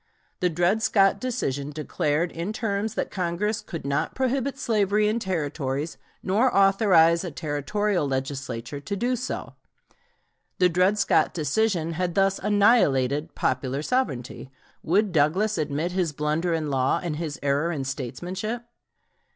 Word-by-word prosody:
The 180 - +2
Dred 175 +6 +1
Scott 195 -2 +3
decision 145 - -2
declared 150 +2 -1
in 170 +6 -4
terms 215 -1 -2
that - - -2
Congress 195 +5 -1
could 165 -5 -7
not 140 +1 -1
prohibit 265 +1 -1
slavery 210 -4 +1
in 220 +2 +1
Territories 150 - -3 0.2
nor 220 +7 +2
authorize 195 -4 +5
a 180 - -3
Territorial 165 +4 -1
Legislature 135 -1 -4
to 145 +8 -4
do 245 +5 0
so. 250 +2 -5 1.0
The 180 -1 +4
Dred 180 +4 +2
Scott 200 - +2
decision 170 0 0
had 175 +1 -2
thus 195 0 +2
annihilated 165 - +2
"popular 130 +2 -1
sovereignty," 135 - -2 0.3
Would 200 +4 +2
Douglas 175 +6 +2
admit 155 +3 -1
his 180 -4 -1
blunder 150 +4 -1
in 155 -3 -2
law, 130 -1 +1
and 160 -4 -3
his 155 -3 -4
error 145 +4 +1
in 145 -5 -3
statesmanship? 180 - -4
175 Hz, 135 wpm, -25 LUFS, 145-205 Hz, 1.0 s, authorize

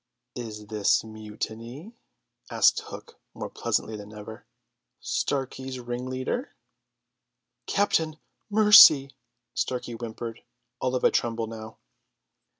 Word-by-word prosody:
"Is 110 -3 -7
this 105 -1 +2
mutiny?" 110 - -7 0.6
asked - - +4
Hook - - -11 0.2
more - - -6
pleasantly 110 - -1
than 105 0 -9
ever. 105 +1 -10 0.5
"Starkey's 130 -1 -3
ringleader!" 130 - -4 1.1
"Captain, 160 -6 +1 0.3
mercy!" 205 -10 +8 0.4
Starkey 125 -1 -3
whimpered, 115 0 -7 0.4
all 130 0 -1
of 125 - -2
a - - +5
tremble 115 -1 0
now. 110 0 -9
120 Hz, 95 wpm, -26 LUFS, 110-135 Hz, 1.1 s, mercy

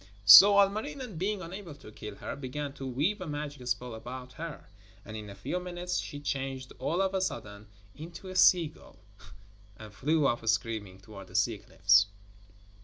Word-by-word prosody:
So 195 - +11
Ilmarinen, 215 - -1
being 195 +1 -2
unable 175 -2 -8
to 110 - -14
kill 105 -1 -9
her, - - -6
began 140 +1 -5
to 135 -1 -7
weave 150 +11 -1
a 185 - -5
magic 145 -3 -6
spell 125 0 -2
about 125 +3 -8
her, 165 0 -8 0.4
and 110 - -8
in 105 -1 -7
a 100 - -10
few 180 - -3
minutes 180 0 -3
she 145 - -6
changed 135 -2 -4
all 165 +8 0
of 190 0 -1
a 190 - 0
sudden 110 - -5 0.3
into 170 +4 -10
a 185 - -7
seagull, 170 -4 +3 0.8
and 110 -1 -11
flew 150 +7 +1
off 120 -4 0
screaming 110 -3 -2
towards 95 -1 -12
the - - -15
sea - - +1
cliffs. 100 +1 +3
140 Hz, 175 wpm, -29 LUFS, 110-180 Hz, 0.8 s, So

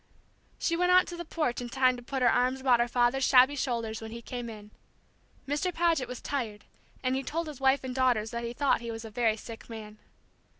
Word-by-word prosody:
She 335 - 0
went 360 +1 +2
out 365 0 +5
on - - -5
the - - -3
porch 305 -7 -1
in 240 - -5
time 255 0 +3
to 245 - -9
put 260 +1 -3
her 240 - +6
arms 255 +2 +1
about 255 -3 +4
her 240 - +2
father's 245 +2 +2
shabby 260 +2 +6
shoulders 230 -5 -2
when 220 - -7
he 230 +1 -7
came 245 -1 -5
in. 210 -1 -11 0.8
Mr. 295 +6 0
Paget 330 -7 +1
was 250 0 -6
tired, 225 -7 -3 0.4
and 255 0 +1
he 265 - 0
told 325 +5 -3
his 295 -4 -9
wife 270 +1 +3
and 260 -1 -4
daughters 245 -4 +1
that 235 0 -4
he 235 - -3
thought 280 0 +1
he 235 - -6
was 225 0 -6
a 220 - -8
very 225 -1 +1
sick 225 +1 -10
man. 215 -2 -9
250 Hz, 230 wpm, -29 LUFS, 230-270 Hz, 0.8 s, her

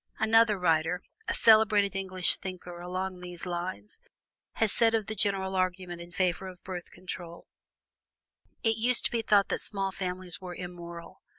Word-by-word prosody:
'" - - -38
Another 220 -1 +4
writer, 170 0 +1 0.2
a - - 0
celebrated 215 -3 +5
English 185 -2 +2
thinker 180 -2 -7
along 185 +1 -4
these 180 0 -6
lines, 180 - -5 0.5
has 220 -2 +1
said 230 -1 +3
of 220 -2 0
the 220 - -4
general 195 -2 0
argument 185 -1 -1
in 170 - -10
favor 185 +1 0
of 180 -1 -11
Birth 180 -2 -6
Control: 175 -2 -8 1.2
"It 225 -1 +2
used 240 +1 +2
to - - +3
be 235 - 0
thought 205 -3 +4
that - - -1
small 195 -2 -2
families 185 -1 -3
were 180 -1 -7
immoral. 175 0 -8
185 Hz, 165 wpm, -29 LUFS, 180-205 Hz, 1.2 s, celebrated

